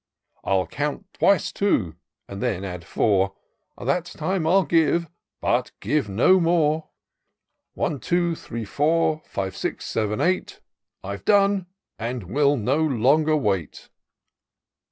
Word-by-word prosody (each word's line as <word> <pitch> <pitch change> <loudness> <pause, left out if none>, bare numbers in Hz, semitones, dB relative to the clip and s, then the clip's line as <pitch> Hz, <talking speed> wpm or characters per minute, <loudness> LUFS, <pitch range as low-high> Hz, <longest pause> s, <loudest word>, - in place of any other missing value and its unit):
I'll 95 -1 +1
count 150 +7 -3
twice 200 -1 +2
two, 105 - 0 0.3
and 100 0 -7
then 110 -7 -1
add 90 -3 -6
four, 95 0 +1 0.4
That 175 -1 0
time 175 0 -2
I'll 190 +2 +4
give, 165 +2 +2 0.3
but - - 0
give 140 -1 0
no 120 - +4
more. 160 -2 +1 0.9
One, 145 - -1
two, 175 +2 +1
three, 115 -7 -6
four, 155 +6 +1
five, 95 -1 -4
six, - - -4
seven, 105 -1 -1
eight. 185 +1 0 0.4
I've 100 +1 -6
done, 200 -2 +3 0.3
and 120 0 -3
will 145 +2 +3
no 125 +5 +1
longer 155 +2 +3
wait.' 95 - -2
145 Hz, 125 wpm, -24 LUFS, 105-170 Hz, 0.9 s, I'll